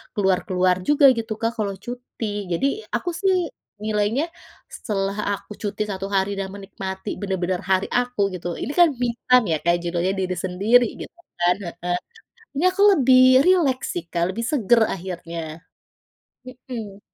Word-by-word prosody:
keluar-keluar 185 -2 +2
juga" 295 -1 +5
gitu 225 -1 -3
Kak 230 0 +1
kalau 200 -2 -1
cuti. 225 -4 -5
Jadi 170 +11 +1 0.3
aku 355 - -2
sih 365 -1 +1 0.3
nilainya 215 +6 0 0.5
setelah 195 -1 -3 0.2
aku 200 - -16
cuti 210 0 -2
1 195 -2 -4
hari 195 0 0
dan 195 - -2
menikmati 195 0 -6
benar-benar 185 -2 -1
hari 190 0 +2
aku 245 -5 0
gitu, 175 -1 -5
ini - - -3
kan 345 - +8
me 245 - +2 0.2
time 250 -2 +6
ya 160 - +2
Kak 170 +1 +3
judulnya 175 +2 0
diri 185 -1 -1
sendiri 210 +7 +4 0.2
gitu - - -8 0.3
kan, 175 +1 +3 0.2
heeh, 175 +1 -2 0.6
ini 285 - -1
aku 375 +2 -2
lebih 260 -5 +5 0.2
rileks 330 -9 +3
sih 170 - -4
Kak, 170 0 0
lebih 230 +4 -3
segar 240 -3 +3
akhirnya. 170 -3 -7 0.8
Mhm. 240 -5 -8
205 Hz, 150 wpm, -23 LUFS, 185-245 Hz, 0.8 s, kan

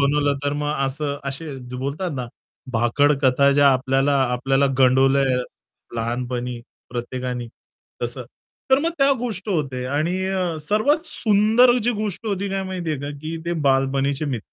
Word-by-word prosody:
बनवलं 145 0 +2
तर 145 - +1
मग 145 0 -1
असं, 140 +1 -3
असे 140 +2 -5 0.2
बोलतात 140 +8 -3
ना, 125 -2 -3 0.5
भाकडकथा 140 +3 +3
ज्या 140 0 +5
आपल्याला 135 +2 +2 0.2
आपल्याला 135 +3 +2
गंडवल्या 135 +1 +4 0.7
लहानपणी 120 +1 -3 0.3
प्रत्येकानी 125 0 -4 0.5
तसं. 120 +1 -4 0.5
तर 265 - +6
मग 330 +3 0
त्या 275 0 +5
गोष्ट 220 -4 -4
होते 135 -8 -1
आणि 155 +7 0
अ, 185 -4 -1
सर्वात 220 - +1
सुंदर 225 +2 +4
जी 245 - +3
गोष्ट 215 0 -4
होती 200 -1 -1
काय 195 0 -1
माहितीये 175 -5 -3
का, 145 +1 -4
की 160 +1 -4
ते 170 - 0
बालपणीचे 135 +1 +1
मि 130 -5 -2
145 Hz, 140 wpm, -22 LUFS, 130-185 Hz, 0.7 s, तर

